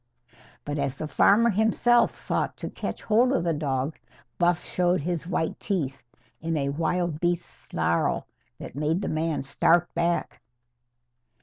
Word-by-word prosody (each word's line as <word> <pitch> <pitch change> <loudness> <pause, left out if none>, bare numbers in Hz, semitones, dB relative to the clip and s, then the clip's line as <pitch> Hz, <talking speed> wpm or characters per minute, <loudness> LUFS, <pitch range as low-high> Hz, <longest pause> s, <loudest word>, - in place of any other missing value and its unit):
But, 145 0 -3
as 140 -1 -2
the 155 - -4
farmer 220 - +4
himself 225 +3 +3
sought - - -2
to - - -6
catch - - -5
hold 235 +4 +3
of 175 - +1
the 170 -1 +1
dog, 140 -1 -2 0.4
Buff 175 -1 +2
showed 180 -1 +1
his 170 +1 -3
white 170 -3 -1
teeth 140 -9 -2 0.4
in 165 0 -1
a 140 -1 0
wild 165 +2 -1
beast 175 0 0
snarl 85 - -1 0.3
that - - -9
made 155 +7 -1
the - - -2
man 155 -2 -1
start 170 +5 +3
back. 170 0 -1
170 Hz, 145 wpm, -26 LUFS, 150-180 Hz, 0.4 s, farmer